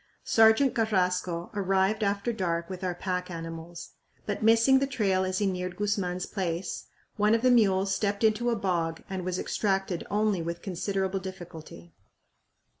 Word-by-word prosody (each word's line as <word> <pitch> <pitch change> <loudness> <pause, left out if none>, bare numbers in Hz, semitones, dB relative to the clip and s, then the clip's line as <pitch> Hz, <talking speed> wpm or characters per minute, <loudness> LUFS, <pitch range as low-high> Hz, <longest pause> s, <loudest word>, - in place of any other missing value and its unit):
Sergeant 225 +4 +5
Carrasco 180 -5 0
arrived 195 +1 +1
after 200 +3 0
dark 170 -4 -2
with 185 0 -7
our 180 -1 -1
pack 180 0 -3
animals, 165 0 -7 0.3
but, 205 - -3
missing 230 +4 +5
the 275 - 0
trail 200 -8 +1
as 185 0 -1
he 205 - +1
neared 180 -1 -2
Guzman's 195 -3 -1
place, 180 -2 -4 0.3
one 210 +1 +4
of 230 - -1
the 255 - +5
mules 195 -4 +3
stepped 200 0 -1
into 220 +2 +2
a 235 - +1
bog 170 -5 -1
and 190 -1 -3
was 180 0 -2
extracted 195 -4 -1
only 210 -3 +1
with 170 +1 -5
considerable 195 +1 -2
difficulty. 175 -3 -10
190 Hz, 155 wpm, -28 LUFS, 180-210 Hz, 0.3 s, Sergeant